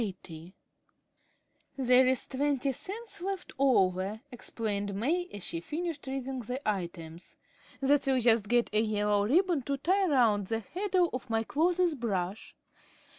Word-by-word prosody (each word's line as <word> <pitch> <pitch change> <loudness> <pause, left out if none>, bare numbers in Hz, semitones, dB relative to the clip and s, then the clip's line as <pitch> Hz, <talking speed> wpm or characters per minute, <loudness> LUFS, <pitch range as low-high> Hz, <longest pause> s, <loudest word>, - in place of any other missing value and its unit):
80 180 -3 -8 1.2
"There's 255 0 +4
twenty 280 0 0
cents 405 - -6
left 385 0 -4
over," 195 -5 +2
explained 205 -4 -3
May, 325 - 0
as 205 - -7
she 165 - -3
finished 310 - -5
reading 265 0 -4
the 250 +2 -4
items. 170 -4 -5 0.4
"That 275 +1 +3
will 265 -1 +3
just 225 -3 +4
get 240 0 +2
a 215 - +4
yellow 210 -1 +1
ribbon 345 - +3
to 275 +2 -2
tie 375 +7 +2
round 225 - +3
the 225 +1 -1
handle 360 - 0
of 255 -1 -5
my 225 0 +1
clothes 345 +6 +1
brush. 205 -6 -3
250 Hz, 135 wpm, -30 LUFS, 205-290 Hz, 1.2 s, There's